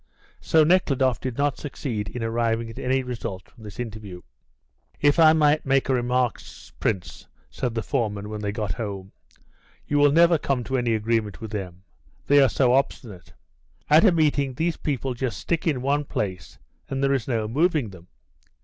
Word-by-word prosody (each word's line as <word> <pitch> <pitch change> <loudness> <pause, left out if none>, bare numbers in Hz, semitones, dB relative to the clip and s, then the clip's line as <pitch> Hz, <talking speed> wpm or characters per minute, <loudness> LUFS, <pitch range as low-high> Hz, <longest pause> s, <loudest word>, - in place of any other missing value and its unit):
So 160 -1 +3
Nekhludoff 140 -7 +2
did 130 -2 -5
not 145 -1 0
succeed 120 -8 -4
in 120 - -5
arriving 115 0 -1
at - - -10
any 130 +1 0
result 115 -7 -5
from 115 - -17
this 105 0 -10
interview. 105 -6 -7 0.8
"If 145 +3 +3
I 160 -1 +7
might 150 -1 +3
make 135 0 +1
a - - +3
remark, 125 -1 0 0.4
Prince," 95 -6 -3 0.2
said 125 -3 -3
the 115 - -2
foreman, 105 -7 -2
when 105 0 -6
they 100 -1 -2
got 105 -2 -3
home, 100 -3 -6 0.7
"you 145 - 0
will 145 0 +5
never 170 +1 +5
come 135 -4 -1
to 130 +2 -2
any 120 -2 +1
agreement 110 -4 -1
with 110 -1 -7
them; 95 -3 -6 0.4
they 145 0 +5
are 135 - +5
so 125 +1 +2
obstinate. 115 - -2 0.6
At 155 +2 +7
a 210 - +6
meeting 145 -5 +1
these 165 +4 0
people 135 -3 -3
just 125 0 -3
stick 170 0 -2
in 135 -6 0
one 145 +2 +1
place, 95 - -4 0.3
and 135 0 -2
there 140 0 +3
is 130 -5 -1
no 115 -4 -1
moving 150 - +1
them. 90 -2 -14
125 Hz, 180 wpm, -24 LUFS, 110-145 Hz, 0.8 s, I